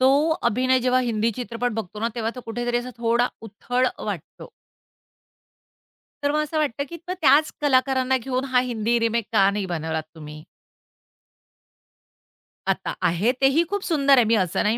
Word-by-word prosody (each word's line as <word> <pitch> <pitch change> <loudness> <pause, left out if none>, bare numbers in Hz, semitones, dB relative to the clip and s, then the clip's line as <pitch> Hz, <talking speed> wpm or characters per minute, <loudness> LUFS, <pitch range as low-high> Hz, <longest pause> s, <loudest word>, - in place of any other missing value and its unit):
तो 260 - +5 0.4
अभिनय 255 +3 +2
जेव्हा 255 +1 +2
हिंदी 230 -2 0
चित्रपट 245 0 -3
बघतो 210 -1 -5
ना, 230 - 0
तेव्हा 225 -1 -2
तो 250 - -7
कुठेतरी 240 +1 -2
असा 245 +1 -5
थोडा 235 +1 +2
उथळ 245 +4 -2
अ, - - -7
वाटतो. - - -7 1.7
तर 285 - +2
मग 305 0 +1
असं 310 +1 -4
वाटतं, 280 -2 0
की 340 - -7
मग - - 0
त्याच 305 +1 +5
कलाकारांना 260 -2 +2
घेऊन 255 +2 -3
हा 250 - +6
हिंदी 230 +1 0
रिमेक 230 -1 0
का 195 -2 +5
नाही 200 -1 -2
बनवलात 160 -2 -3
तुम्ही? 150 0 -10 2.2
आता - - -1
आहे, 180 +8 +1
तेही 275 +5 +4
खूप 405 -1 -2
सुंदर 280 -4 +3
आहे. 245 - +6
मी 225 +1 +3
असं 185 -5 0
नाही 215 +3 +1
240 Hz, 160 wpm, -23 LUFS, 220-260 Hz, 2.2 s, हा